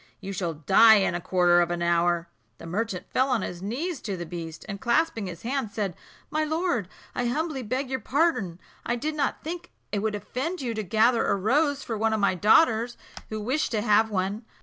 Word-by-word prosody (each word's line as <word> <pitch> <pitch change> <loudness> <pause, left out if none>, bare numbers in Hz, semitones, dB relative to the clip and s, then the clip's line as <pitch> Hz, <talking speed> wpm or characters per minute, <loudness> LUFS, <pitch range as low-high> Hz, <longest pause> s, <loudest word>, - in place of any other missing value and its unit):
You 195 -1 -6
shall 175 -3 -2
die 205 +9 +6
in 195 -4 +2
a 175 - -3
quarter 175 -1 +4
of 175 - +1
an 175 0 -2
hour." 170 0 +2 0.3
The - - -11
merchant 190 +2 -3
fell 260 +1 +2
on 250 -4 +1
his 175 0 -6
knees 275 - -3
to 200 -4 -4
the 175 - -5
beast, 165 -2 -7
and 200 -2 -6
clasping 235 -4 +1
his 170 -2 -8
hands, 250 -3 -2
said, 200 -5 -2 0.4
"My 310 +1 +1
lord, 315 - 0 0.3
I 245 - -1
humbly 300 +2 -1
beg 255 +4 -2
your 260 0 -2
pardon. 250 - 0 0.2
I 235 - -1
did 305 +6 -2
not 290 -3 -1
think 335 +2 -6 0.2
it 205 - 0
would 215 +1 -1
offend 260 - -4
you 245 -4 -2
to 220 - -2
gather 225 +4 +3
a - - +2
rose 280 +8 +1
for 225 -3 -4
one 220 0 +2
of 220 - 0
my 200 -2 +3
daughters, 225 - +3 0.3
who 215 - -4
wished 255 +9 0
to 215 - +1
have 220 0 +4
one." 200 +2 -2
220 Hz, 215 wpm, -26 LUFS, 185-260 Hz, 0.4 s, die